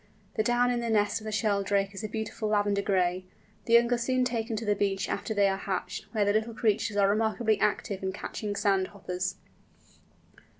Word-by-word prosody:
The - - +2
down 240 +2 +2
in 245 - 0
the 235 -1 -2
nest 210 0 +1
of - - -11
the 215 - -3
Sheldrake 200 -2 +1
is 195 - -7
a - - -1
beautiful 220 0 -3
lavender 205 -1 +2
gray. 185 -2 +1 0.4
The 230 - 0
young 235 +1 +6
are 240 - +1
soon 255 +1 +1
taken 230 -2 -2
to 220 +1 -4
the 210 - +3
beach 195 -1 0
after - - -3
they 200 -1 +4
are 195 0 0
hatched, 190 -1 -4
where 215 -3 +1
the 205 - +2
little 220 +1 -1
creatures 215 -1 0
are 200 -1 +5
remarkably 220 +1 +1
active 200 -2 0
in 190 0 -1
catching 205 +1 -5
sand 195 -2 +2
hoppers. 185 -1 -4
210 Hz, 205 wpm, -28 LUFS, 200-225 Hz, 0.4 s, young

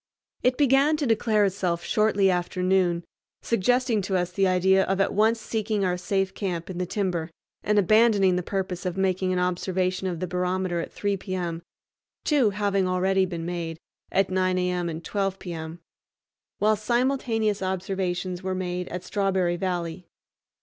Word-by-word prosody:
It 250 0 +2
began 285 +2 +4
to 295 - -1
declare 220 -2 +2
itself 180 -3 -1
shortly 205 -3 +2
after 180 +1 -2
noon, 180 -2 +2 0.4
suggesting 235 +1 +2
to 190 0 0
us 180 0 -1
the 195 +1 +2
idea 190 +1 +4
of 195 0 -1
at 195 - +2
once 220 +3 +3
seeking 215 -2 -1
our 180 -1 +1
safe 190 +1 -1
camp 180 -3 -3
in 180 - -6
the 180 - -1
timber 180 -5 -2 0.3
and 210 0 +1
abandoning 205 -2 +4
the 180 - 0
purpose 185 -1 -3
of 180 -1 -3
making 185 -1 +1
an 185 - 0
observation 185 +1 -1
of 175 -3 -3
the 185 - -1
barometer 180 0 -1
at 165 - -5
3 200 -1 -1
p.m.,—two 185 - -3
having 200 -2 0
already 190 +1 +2
been 170 -2 -5
made, 170 -2 -4 0.3
at 195 -1 +2
9 185 0 +1
a.m., 180 -1 0
and 165 +1 -6
12 195 -2 -1
m., 165 -1 -6 0.8
while 215 +1 +3
simultaneous 225 -2 0
observations 185 -1 -2
were 190 0 -2
made 180 -1 -3
at 180 0 -5
Strawberry 190 -2 0
Valley. 175 -1 -3
185 Hz, 160 wpm, -25 LUFS, 180-205 Hz, 0.8 s, began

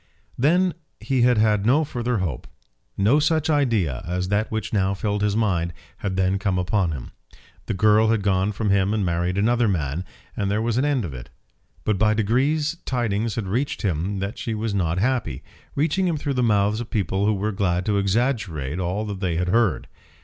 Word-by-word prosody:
Then 175 +7 +3 0.3
he 130 -3 0
had 120 -1 +4
had 105 -2 +3
no 135 +8 +4
further 125 -4 -2
hope. 85 -9 -3 0.5
No 110 +10 +4
such 155 +1 +1
idea 115 - +1
as 90 +1 -2
that 105 +2 +1
which 110 -1 -4
now 100 -1 +1
filled 105 +1 -2
his 105 -1 +1
mind 90 -6 0 0.2
had 95 -2 -3
then 95 +1 +1
come 95 -2 0
upon 90 -1 +1
him. 70 -6 -7 0.6
The - - -1
girl 105 +3 +4
had 110 -3 +1
gone 95 0 +1
from 105 0 -1
him 100 +1 +2
and 105 -3 0
married 90 +2 -1
another 120 +3 +2
man, 80 -3 -1 0.3
and 100 - -1
there 105 +1 +1
was 115 +1 0
an 135 - +1
end 140 -7 +1
of 75 - -6
it. - - -9 0.5
But 105 -3 0
by 110 0 +3
degrees 140 +9 +1
tidings 115 -4 -1
had 110 - -2
reached 120 +10 -2
him 95 +1 -1
that 100 +2 -4
she 115 - -3
was 110 0 -2
not 85 -3 0
happy, 105 - -1 0.3
reaching 165 +6 +1
him 165 -3 0
through 145 -1 -2
the 125 - 0
mouths 105 -2 +2
of 120 - -7
people 100 -1 0
who 110 - +2
were 105 +2 -1
glad 90 -3 0
to 105 -2 +1
exaggerate 100 - -1
all 95 +4 -2
that 100 -3 -5
they 90 -4 -1
had 90 +2 0
heard. 115 0 +2
105 Hz, 200 wpm, -23 LUFS, 95-120 Hz, 0.6 s, had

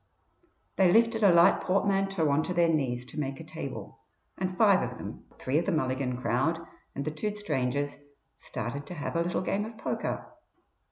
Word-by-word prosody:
They 185 -2 +5
lifted 230 +2 +4
a 200 - +7
light 170 +3 +6
portmanteau 195 -2 +1
on 140 +2 +3
to 180 - -3
their 170 -1 +4
knees 125 -5 0
to 140 - -7
make 135 -2 -3
a - - -7
table, - - -7 0.4
and 185 -1 -3
five 200 -4 +5
of - - -4
them - - -8
three 135 +4 +1
of 170 - -3
the - - +2
Mulligan 130 -4 0
crowd 130 +7 +1 0.4
and 140 - -3
the 155 - -1
two 205 +8 -3
strangers 145 -7 -1 0.4
started 125 +4 -5
to 180 - -6
have 150 +2 -4
a 165 - +2
little 175 +1 0
game 195 +2 0
of 220 +1 -8
poker. - - -3
165 Hz, 185 wpm, -29 LUFS, 140-195 Hz, 0.4 s, a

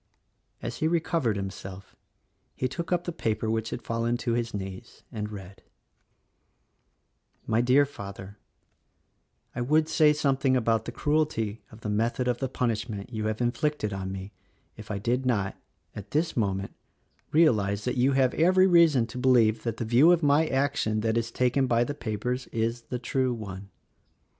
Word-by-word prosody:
As - - -4
he 155 - +1
recovered 160 - 0
himself 95 0 -7 0.6
he 130 - -1
took 165 +7 -6
up 175 -1 +1
the 175 - -3
paper 110 - -1
which 110 0 -1
had - - -6
fallen 115 +1 -1
to 120 -1 -2
his 115 0 -1
knees 95 -2 -7
and 105 -1 -4
read: 95 -2 -10 1.8
"My 115 +1 +2
Dear 130 +4 +4
Father: 100 -5 -9 0.6
— - - -44
I - - -2
would 155 +5 +2
say 155 -2 +4
something 135 -3 +1
about 115 -2 +1
the - - -4
cruelty 145 -7 -1
of 110 +1 -14
the 105 - -4
method 115 +4 0
of 120 -1 0
the 135 - -2
punishment 115 -3 -3
you 110 -1 -2
have 110 +2 -3
inflicted 120 -2 -1
on 95 -1 -4
me 95 +1 -7 0.4
if 110 -1 -11
I 105 - -2
did 120 +6 0
not, 105 -7 0 0.4
at 105 -1 -8
this 160 +2 0
moment, 100 -3 -1 0.6
realize 105 -11 +3
that 125 - -1
you 130 +2 +3
have 130 -1 +3
every 185 +3 +4
reason 165 -9 +5
to 120 +2 -8
believe 120 -4 +4
that 115 -2 -3
the 115 - -3
view 125 +9 +5
of 170 -2 +3
my 145 +2 +4
action 135 -6 0
that 110 0 0
is 115 0 0
taken 125 +3 +1
by 120 -1 +3
the 145 - -3
papers, 125 +1 -3
is 115 +1 -2
the 125 - -2
true 125 0 -1
one. 100 -3 -8
120 Hz, 170 wpm, -27 LUFS, 105-135 Hz, 1.8 s, reason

